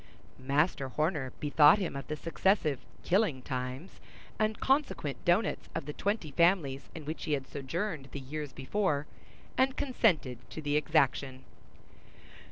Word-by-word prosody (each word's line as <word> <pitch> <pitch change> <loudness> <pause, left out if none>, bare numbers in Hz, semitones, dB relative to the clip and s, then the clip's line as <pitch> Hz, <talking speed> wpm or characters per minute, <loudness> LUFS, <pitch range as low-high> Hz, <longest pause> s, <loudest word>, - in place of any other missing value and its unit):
Master 140 +1 +1
Horner 150 -1 -1
bethought 150 +3 +6
him 185 -8 -3
of 140 - -5
the 155 - -2
successive 155 - +1 0.2
"killing 180 - +2
times," 130 +5 -5 0.4
and 215 0 +1
consequent 265 - 0
doughnuts 180 +5 +1
of - - -3
the 150 - -5
twenty 200 -5 -2
families 155 -4 +2
in 160 -3 -7
which 155 +2 -5
he 155 - 0
had 135 -2 -1
sojourned 150 +1 -4
the 140 - -5
years 145 +2 -5
before, 145 +2 -1 0.5
and 260 0 +3
consented 175 - +1
to - - -7
the 145 -1 -1
exaction. 140 -3 +1
150 Hz, 140 wpm, -31 LUFS, 135-185 Hz, 0.5 s, bethought